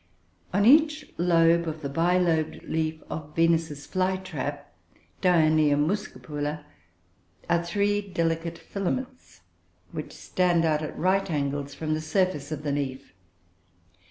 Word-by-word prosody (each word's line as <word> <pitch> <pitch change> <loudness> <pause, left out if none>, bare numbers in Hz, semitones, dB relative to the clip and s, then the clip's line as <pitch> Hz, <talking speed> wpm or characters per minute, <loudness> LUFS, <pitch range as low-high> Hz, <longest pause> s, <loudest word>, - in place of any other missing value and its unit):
On 200 +4 +2
each 305 +3 +4
lobe 170 -1 +4
of 155 0 -5
the - - -1
bilobed 165 +1 +1
leaf 160 -1 -2
of 150 -1 -7
Venus's 165 -3 +1
fly 185 0 0
trap 185 0 -6 0.5
(Dionoea 155 -5 +4
muscipula) 150 -3 -2 0.8
are 170 0 +2
three 205 +4 +1
delicate 165 -3 -2
filaments 255 +7 -5 0.5
which - - -6
stand 175 -2 +1
out 155 -1 +2
at 155 - -5
right 190 +2 +1
angle 145 -2 -1
from 155 +2 -3
the 155 - -1
surface 155 -3 0
of 150 -1 -4
the 145 - -1
leaf. 140 -1 -4
165 Hz, 125 wpm, -26 LUFS, 155-185 Hz, 0.8 s, each